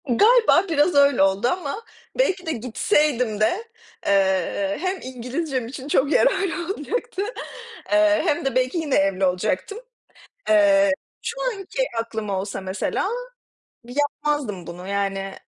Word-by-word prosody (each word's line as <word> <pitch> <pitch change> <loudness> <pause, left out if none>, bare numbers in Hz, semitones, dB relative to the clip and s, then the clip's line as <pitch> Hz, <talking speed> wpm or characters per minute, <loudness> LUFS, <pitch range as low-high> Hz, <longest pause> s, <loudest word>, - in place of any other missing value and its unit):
Galiba 425 - +5
biraz 315 +1 +2
öyle 280 -6 +5
oldu. 195 +4 +2
Ama 355 - -2 0.4
belki 380 -7 +1
de 320 - -1
gitseydim 250 - 0
de, 225 - +1 0.4
eee, 195 0 +1
hem 375 +1 -1
İngilizcem 260 +1 -4
için 265 +2 -8
çok 285 0 +2
yararlı 375 -6 +1
olacaktı, 470 +5 -4 0.7
eee, 310 0 +4
hem 295 -5 0
de 270 - -1
belki 255 +5 +1
yine 310 -4 0
evli 195 -1 +2
olacaktım. 185 - -1 0.7
Eee, 300 -2 +5 0.3
şu 465 - -4 0.2
anki 430 +5 -3
aklım 225 -2 -4
olsa 195 0 -3
mesela, 190 - -2 0.8
yapmazdım 290 - -2
bunu. 175 +2 -8
Yani, 195 -1 -2
275 Hz, 125 wpm, -23 LUFS, 200-330 Hz, 0.8 s, Galiba